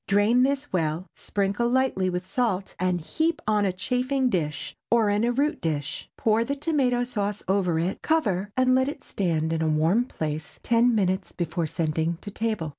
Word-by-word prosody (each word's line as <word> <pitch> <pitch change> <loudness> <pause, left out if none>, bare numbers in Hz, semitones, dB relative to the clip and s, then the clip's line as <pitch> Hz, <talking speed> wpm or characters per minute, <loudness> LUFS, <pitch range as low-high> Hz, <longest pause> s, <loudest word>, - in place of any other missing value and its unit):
Drain 210 +5 +4
this 275 0 0
well, 165 0 0
sprinkle 205 +4 -1
lightly 250 -7 +1
with 180 0 -3
salt, 200 -3 -1
and 180 -1 0
heap 320 - 0
upon 210 -1 +2
a 190 - +2
chafing 250 +7 0
dish 150 -6 -2
or 225 -3 +3
in 205 +2 +1
a 240 - +2
root 285 +5 0
dish. 150 -3 -3
Pour 220 +1 +2
the 280 +4 -2
tomato 275 -5 +1
sauce 210 -4 -2
over 185 -3 +1
it; 170 +4 -1
cover 205 - +1
and 255 0 +4
let 260 +1 +3
it 290 - -8
stand 165 -4 -1
in 160 - -1
a 160 - +1
warm 165 +10 +2
place 155 -8 -5
ten 235 0 +3
minutes 190 -2 0
before 170 -1 -2
sending 160 +1 -1
to 205 - -7
table. 215 -7 -2
205 Hz, 185 wpm, -26 LUFS, 175-245 Hz, -, Drain